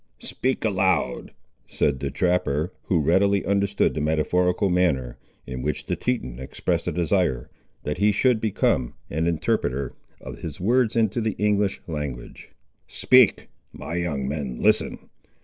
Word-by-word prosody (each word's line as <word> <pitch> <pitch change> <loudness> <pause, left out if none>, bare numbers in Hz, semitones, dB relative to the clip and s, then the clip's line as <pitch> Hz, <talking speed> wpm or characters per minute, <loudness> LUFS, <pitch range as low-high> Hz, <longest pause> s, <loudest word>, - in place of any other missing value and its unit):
"Speak 130 -2 -2
aloud!" 95 -5 0 0.4
said 70 -3 0
the - - -2
trapper, 90 -2 0
who 85 -5 +1
readily 100 +5 +3
understood 100 0 +1
the 75 - -3
metaphorical 90 +5 +1
manner, 70 -10 0 0.3
in 65 0 -5
which 75 0 -3
the 90 - -1
Teton 85 - -3
expressed 65 - -2
a - - +1
desire 85 -8 0 0.3
that 75 +3 -3
he 105 +1 +4
should 115 +2 +2
become 95 - 0 0.2
an 80 +3 0
interpreter 70 -5 -1 0.3
of - - -9
his - - -7
words 115 +4 +2
into 115 0 +1
the 110 -1 -1
English 105 -1 +1
language; 75 -8 -6 0.4
"speak, - - +4 0.3
my - - -7
young 80 -6 -2
men 70 -4 -4
listen. - - +1
90 Hz, 140 wpm, -24 LUFS, 70-100 Hz, 0.4 s, he